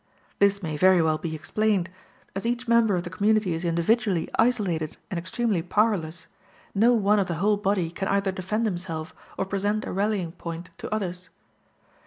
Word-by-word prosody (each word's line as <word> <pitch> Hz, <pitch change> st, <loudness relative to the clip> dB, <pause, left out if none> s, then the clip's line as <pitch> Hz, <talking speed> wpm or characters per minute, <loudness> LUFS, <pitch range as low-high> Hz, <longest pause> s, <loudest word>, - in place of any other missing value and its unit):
This 200 Hz, 0 st, +3 dB
may 155 Hz, -2 st, -3 dB
very 185 Hz, +2 st, +5 dB
well 160 Hz, -1 st, +2 dB
be 160 Hz, -2 st, -4 dB
explained: 195 Hz, +5 st, 0 dB, 0.5 s
as 195 Hz, -, -3 dB
each 240 Hz, +1 st, -2 dB
member 230 Hz, -3 st, +4 dB
of 175 Hz, -, -1 dB
the 175 Hz, -, -7 dB
community 210 Hz, -1 st, +2 dB
is 165 Hz, +2 st, -4 dB
individually 175 Hz, +2 st, +1 dB
isolated 200 Hz, -10 st, +1 dB
and 180 Hz, -, -1 dB
extremely 190 Hz, +1 st, -1 dB
powerless, 175 Hz, -3 st, 0 dB, 0.5 s
no 230 Hz, +4 st, +4 dB
one 210 Hz, -1 st, +3 dB
of 195 Hz, -, +1 dB
the 170 Hz, -, -2 dB
whole 205 Hz, +6 st, +2 dB
body 195 Hz, -4 st, 0 dB
can 195 Hz, +2 st, -3 dB
either 195 Hz, 0 st, +1 dB
defend 190 Hz, +5 st, -2 dB
himself 175 Hz, -5 st, -4 dB, 0.2 s
or 195 Hz, -, 0 dB
present 205 Hz, +2 st, -1 dB
a -, -, -4 dB
rallying 195 Hz, -3 st, 0 dB
point 170 Hz, 0 st, -7 dB
to -, -, -6 dB
others. 180 Hz, -4 st, -3 dB
195 Hz, 175 wpm, -26 LUFS, 170-215 Hz, 0.5 s, very